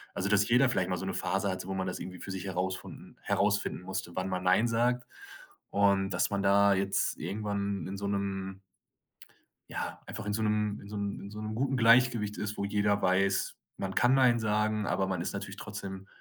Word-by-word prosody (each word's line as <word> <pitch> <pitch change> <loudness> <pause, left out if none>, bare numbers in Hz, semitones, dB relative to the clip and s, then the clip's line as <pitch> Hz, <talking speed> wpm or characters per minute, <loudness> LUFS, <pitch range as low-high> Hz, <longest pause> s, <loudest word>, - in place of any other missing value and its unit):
Also, 95 - -1
dass 100 0 +3
jeder 125 +3 +5
vielleicht 95 -7 0
mal 90 - 0
so 95 - -5
'ne 95 - -2
Phase 95 +3 0
hatte, 90 0 -4
wo 95 - -3
man 95 -1 -1
das 90 - -3
irgendwie 90 -1 -7
für 100 - -7
sich 95 0 -5
herausfinden- 95 0 -4
herausfinden - - 0
musste, 95 -2 -5
wann 95 +1 -1
man 90 -1 -2
nein 95 +6 +4
sagt. 120 +2 +1 0.6
Und 100 -1 +3
dass - - +1
man 100 -1 0
da 100 0 +5
jetzt 100 +1 0
irgendwann 100 -1 -2
in 95 - -5
so 100 0 -3
'nem 95 -1 -3 1.1
ja, - - -4
einfach 110 - -6
in 105 - 0
so 110 +1 0
'nem 105 -1 0
in 100 - -11
so 105 - -6
'n 100 -1 -3
in 100 - -9
so 105 0 -7
'nem 110 0 -4
guten 135 +3 0
Gleichgewicht 115 -3 +4
ist, 105 0 -3
wo 100 - -1
jeder 100 0 +1
weiß, 95 +1 +2 0.2
man 95 -1 -4
kann 120 +2 +4
nein 125 -3 +5
sagen, 105 -1 +1
aber 95 - 0
man 95 -2 -1
ist - - -3
natürlich - - -5
trotzdem 95 0 -7
100 Hz, 210 wpm, -30 LUFS, 95-105 Hz, 1.1 s, jeder